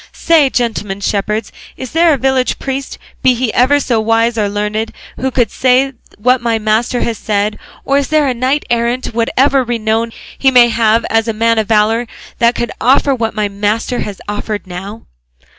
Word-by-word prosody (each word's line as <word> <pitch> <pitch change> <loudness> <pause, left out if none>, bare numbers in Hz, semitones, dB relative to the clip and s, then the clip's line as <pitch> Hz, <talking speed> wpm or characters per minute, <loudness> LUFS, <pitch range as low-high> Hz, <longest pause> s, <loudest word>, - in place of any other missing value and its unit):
Say, 320 -5 +3
gentlemen 215 -6 -2
shepherds, 210 +2 -2 0.3
is 260 - -7
there 330 +1 +4
a 290 - +2
village 265 -1 0
priest, 270 0 -5 0.2
be 255 -1 +4
he 240 -2 -2
ever 270 +4 +3
so 240 -5 0
wise 225 +1 +1
or 210 -2 0
learned, 210 +2 -2 0.3
who 265 - -1
could 245 -2 0
say 260 +1 +2 0.2
what 250 +4 +2
my 230 -1 0
master 220 +3 0
has 230 -2 -2
said; 210 0 -1 0.3
or 275 +1 +2
is 280 - -2
there 300 -4 +2
knight 260 +4 0
errant, 235 +1 -1
whatever 260 +4 +2
renown 230 -1 -1 0.2
he 270 - +3
may 245 -2 +6
have 225 0 +2
as 225 0 +2
a 225 - 0
man 230 +1 +2
of 215 - -1
valour, 225 +2 +2 0.3
that 235 0 +3
could 235 - -2
offer 275 +3 +3
what 230 -3 -2
my 210 -1 0
master 210 +4 -2
has 205 -2 -5
offered 205 0 -4
now?" 190 +4 -8
230 Hz, 180 wpm, -14 LUFS, 215-255 Hz, 0.3 s, may